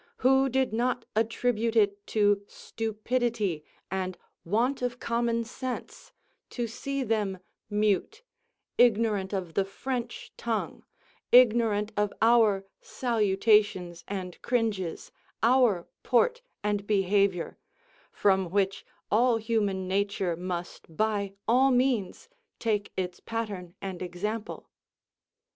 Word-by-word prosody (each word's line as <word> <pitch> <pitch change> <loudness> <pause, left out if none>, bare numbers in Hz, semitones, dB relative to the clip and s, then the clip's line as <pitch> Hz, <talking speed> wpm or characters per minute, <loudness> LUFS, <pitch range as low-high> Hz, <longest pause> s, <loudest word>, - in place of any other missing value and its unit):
Who 265 +1 +5
did 265 -2 +1
not 245 +1 0
attribute 230 +1 0
it 205 -2 +2
to 205 -2 +2
stupidity 220 -5 -2 0.3
and 185 -1 -2 0.3
want 235 +10 0
of 245 0 -2
common 235 0 0
sense 255 +2 -6 0.4
to 240 - -3
see 275 +4 -3
them 210 -5 0 0.3
mute, 210 - 0 0.6
ignorant 215 -5 +3
of 185 -5 -3
the 195 - +2
French 240 +5 -5
tongue, 225 -2 -3 0.5
ignorant 225 -4 +5
of 210 -1 +1
our 220 -4 +4 0.2
salutations 205 -6 +1
and 185 -3 -5
cringes, 220 -8 -1 0.3
our 235 -7 +4 0.2
port 475 - +2 0.2
and 205 -1 -1
behaviour, 195 -3 +1 0.5
from 190 -3 +2
which 195 +1 0 0.3
all 235 +2 +4
human 210 -4 -1
nature 195 -2 0
must 175 -2 -6
by 205 -2 0
all 255 +4 +5
means 250 -6 +1 0.3
take 210 -3 -1
its 180 -1 -3
pattern 205 -6 -5
and 190 -2 -5
example. 210 +5 -4
215 Hz, 105 wpm, -28 LUFS, 195-235 Hz, 0.6 s, Who